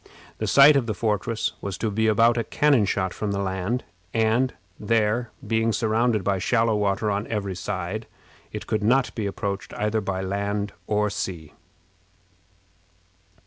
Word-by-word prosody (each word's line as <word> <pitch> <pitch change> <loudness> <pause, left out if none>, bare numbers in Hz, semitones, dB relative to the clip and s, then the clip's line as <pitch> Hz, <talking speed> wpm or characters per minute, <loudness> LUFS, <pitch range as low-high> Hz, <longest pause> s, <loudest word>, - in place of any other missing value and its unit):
The - - -2
site 140 +2 +7
of 130 -4 +1
the 110 - -2
fortress 110 +1 -1
was 100 -2 -4
to 110 - -1
be 110 +2 +1
about 115 +2 +4
a 115 - 0
cannon 140 -6 +3
shot 95 -1 -1
from 105 -2 -3
the 100 +4 -1 0.4
and, 115 +3 +2 0.3
where, 110 +2 +1 0.2
being 115 0 +1
surrounded 110 0 +1
by 100 0 0
shallow 115 +3 +2
water 105 +1 0
on 100 +2 -2
every 100 -4 -3
side, 95 +3 -4 0.4
it - - -6
could 110 - -1
not 125 +4 +2
be 110 -3 -2
approached 100 0 -4
either 105 +1 0
by 95 -1 -3
land 100 +1 -2
or 105 0 +1
sea. 85 -6 -5
105 Hz, 150 wpm, -24 LUFS, 100-115 Hz, 0.4 s, site